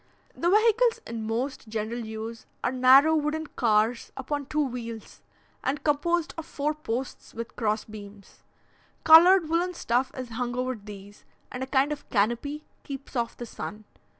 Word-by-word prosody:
The 340 - 0
vehicles 455 +4 +4
in 225 -1 -5
most 235 +2 -3
general 220 +2 -3
use 220 0 -7 0.2
are - - +1
narrow, 265 +5 +6
wooden 310 +1 -1
cars 230 -3 +1
upon 280 +1 -3
two 300 0 +1
wheels, 230 -3 -7 0.4
and 280 +3 -1
composed 325 +3 +1
of 325 - -7
four 300 +1 -1
posts 265 -4 -5
with 230 +1 -6
cross 215 -2 0
beams. 205 -2 -12 0.6
Coloured 335 +2 +8
woollen 345 +3 0
stuff 250 -3 0
is 255 -2 -5
hung 245 +1 -3
over 255 +1 -1
these, 205 -2 -12 0.3
and 250 - -6
a 260 - -3
kind 270 +2 +2
of 295 - -6
canopy 240 +8 0 0.2
keeps 275 -1 -8
off 235 -1 -2
the 240 - -6
sun. 215 -1 -7
255 Hz, 155 wpm, -27 LUFS, 225-300 Hz, 0.6 s, Coloured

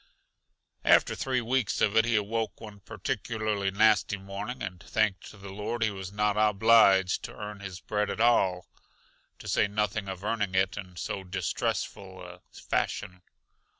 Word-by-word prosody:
After - - +5
three 130 -2 -1
weeks 120 -1 0
of 105 0 +2
it 115 0 +5
he 120 -1 +1
awoke 110 +2 -1
one 105 -2 -10
particularly 105 0 -2
nasty 105 0 +3
morning 100 +6 -6
and 90 -3 -6
thanked 100 +3 -1
the 100 -2 -11
Lord 105 +4 -3
he 110 - +1
was 95 -1 -7
not 105 0 +1
obliged 105 -3 +4
to - - -9
earn 105 -1 -7
his 95 -2 -7
bread 105 0 -1
at 100 - -4
all, 95 -6 +3 0.7
to - - -11
say - - +2
nothing 105 -1 -2
of 95 0 -6
earning 105 -3 -1
it 95 0 +2
in 90 -3 -8
so 95 +2 -4
distressful 95 0 -3
a 90 0 -11
fashion. 90 0 -3
105 Hz, 155 wpm, -28 LUFS, 95-110 Hz, 0.7 s, After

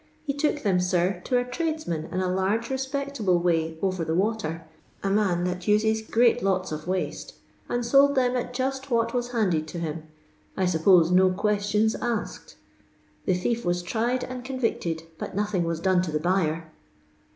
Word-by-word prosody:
He 280 - -1
took 295 +1 0
them, 190 -4 +2
nr, 180 0 0
to 250 - +2
a 245 - +1
tradeiman 250 - -3
in 185 - -1
a 185 - 0
laige 190 +5 0
reipect 275 0 -3
able 185 -4 +3
way 165 -2 0
OTer 185 -3 0
the 160 0 -1
water— 185 -5 -1 0.2
« - - -30
man 195 -3 +1
that 180 0 -1
oiei 220 +3 +1
great 240 +1 +4
loto 185 -3 0
of 155 +2 -6
waite—and 235 +6 -4
lold 280 +1 +6
them 255 -1 +2
at 245 0 -2
juit 265 +2 -3
what 230 -1 +1
was 245 -1 -1
luded 185 -10 0
to 165 - -7
him: 160 -1 -4 0.5
I 190 - +1
tnppote 175 0 +4
no 185 +1 +5
qoettiona 210 +3 +1
aaked. 235 -3 -4 0.7
The 185 - +2
thief 230 +6 -1
waa 175 - +2
tried 240 +6 0
and 255 -1 -6
convicted, 230 -11 -2 0.2
bnt - - -6
nothing 205 -4 0
wai 165 0 -1
done 185 +2 +2
to 175 -3 -3
the 155 - 0
buyer." 165 -2 0
195 Hz, 175 wpm, -26 LUFS, 175-245 Hz, 0.7 s, lold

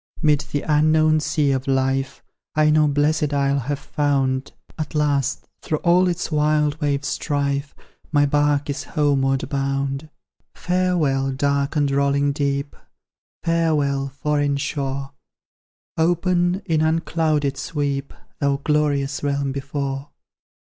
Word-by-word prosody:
'Mid 150 -2 +2
the 145 - -1
unknown 155 +1 +3
sea, 150 -2 +1
of 135 0 -2
life 135 0 0 0.3
I 155 0 +4
no 155 0 +4
blest 150 +1 +1
isle 140 0 +2
have 140 +3 -2
found; 135 -2 -1 0.2
At 155 -1 -5
last, 145 -2 0
through 155 - -1
all 180 +1 +4
its 175 -1 -2
wild 150 0 +1
wave's 140 -1 0
strife, 140 -1 -2 0.4
My 145 -2 +4
bark 145 0 +1
is 145 0 -3
homeward 140 -2 +1
bound. 140 +1 -2 0.5
Farewell, 170 -7 +1
dark 140 +1 0
and 145 -2 +2
rolling 140 +1 +2
deep! 140 0 -2 0.7
Farewell, 150 -5 +1
foreign 145 0 0
shore! 140 -1 -3 0.9
Open, 175 +2 +1
in 160 -5 +1
unclouded 155 -3 +1
sweep, 140 -2 -3 0.3
Thou 140 -1 +1
glorious 145 -2 0
realm 140 -1 -1
before! 140 0 -4
145 Hz, 120 wpm, -22 LUFS, 140-155 Hz, 0.9 s, I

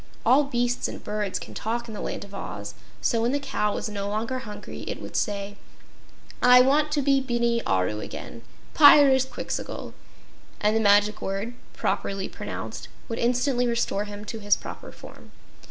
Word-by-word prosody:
All 285 +3 +5
beasts 245 -2 0
and - - -8
birds 210 -2 -2
can - - -9
talk 235 +2 -3
in 220 - -8
the 210 - -6
Land - - -4
of 200 0 -13
Oz, - - -6 0.3
so 230 -2 +1
when 240 +3 +1
the 285 - +1
cow 270 -7 -1
was - - -3
no 200 -1 -4
longer 225 +5 -2
hungry, 210 -4 -8
it - - -4
would - - -9
say: 205 0 -2 0.8
"I 250 0 +8
want 295 +4 +3
to 290 -2 +1
be 275 0 +3
Bini 235 -2 0
Aru 95 +3 +1
again: 115 +1 -8 0.3
Pyrzqxgl!" 275 -3 +4 0.7
and 210 +1 +2
the - - +3
magic 205 0 +4
word, 195 +5 -3 0.2
properly 195 -1 -2
pronounced, - - -6 0.2
would 230 - -3
instantly 245 +1 +1
restore 235 -3 0
him 205 0 -8
to 225 +1 -6
his 205 -1 +3
proper - - -9
form. - - -14
230 Hz, 170 wpm, -25 LUFS, 205-255 Hz, 0.8 s, I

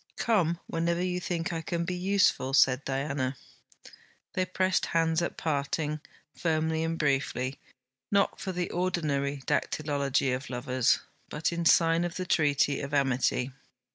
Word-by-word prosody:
'Come 175 -7 +1
whenever 170 +1 -1
you 180 -1 -1
think 175 0 -2
I 165 - -2
can 170 +1 -2
be 180 - -2
useful,' 180 -8 +2
said 130 -1 +4
Diana. 135 -1 -2 1.0
They 185 - +1
pressed 185 0 +1
hands 165 0 +2
at 170 - -3
parting, 150 0 -1 0.4
firmly 160 -1 0
and 165 0 -1
briefly, 135 -3 0 0.5
not 200 -1 +2
for 190 - -3
the 180 -1 -3
ordinary 145 -6 -1
dactylology 140 -3 0
of 130 +3 -7
lovers, 125 0 +1 0.3
but 160 +3 -1
in 170 0 -2
sign 165 +1 +5
of 175 -1 -3
the 185 - -3
treaty 145 -4 +2
of 140 +1 -3
amity. 130 -1 +1
160 Hz, 140 wpm, -29 LUFS, 140-175 Hz, 1.0 s, sign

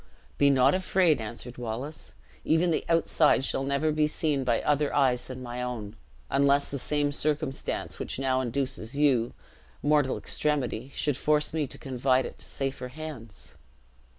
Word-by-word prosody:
"Be 140 - +6
not 135 0 +5
afraid," 185 -6 +2
answered 120 +3 -7
Wallace; 125 +6 -5 0.3
"even 165 +2 +2
the - - 0
outside 160 -4 +3
shall 135 - -1
never 140 +3 +1
be 150 0 +2
seen 150 -3 0
by 120 -2 +2
other 145 0 +2
eyes 130 -3 +2
than 130 0 -7
my 120 0 -5
own, 115 -4 -4 0.3
unless 140 - +2
the 140 - -3
same 145 +1 0
circumstance 150 -1 -2
which - - -3
now 130 -1 +1
induces 130 0 -3
you, 130 -6 +2 0.5
mortal 145 -2 +3
extremity, 140 -4 -1
should 145 -3 0
force 150 +1 +1
me 155 -3 0
to - - -9
confide 130 -1 +1
it - - -8
to - - -7
safer 135 -2 -3
hands." 125 -7 -9
140 Hz, 155 wpm, -28 LUFS, 125-150 Hz, 0.5 s, Be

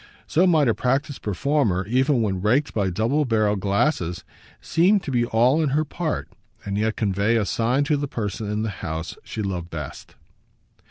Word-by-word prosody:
So 180 +4 +3
might 155 -6 +4
a 115 - +3
practised 135 +4 -1
performer, 105 -3 0
even 130 +3 +2
when 95 -4 -1
raked 125 +9 +1
by 100 -3 0
double 115 - +1
barrelled 110 -5 +1
glasses, 100 - 0 0.4
seem 190 +5 +3
to 160 - -6
be 120 -2 +2
all 125 +7 +3
in 155 - +1
her 155 - +1
part 160 +1 -3 0.4
and 100 0 -3
yet 110 +1 0
convey 100 +2 +1
a 110 - +1
sign 120 +7 +1
to 150 0 +1
the 145 0 -2
person 105 -3 -4
in 105 +1 -1
the 110 - -2
house 80 +1 -4
she 110 - -5
loved 90 -3 -4
best. 75 -5 -8
115 Hz, 180 wpm, -23 LUFS, 100-145 Hz, 0.4 s, might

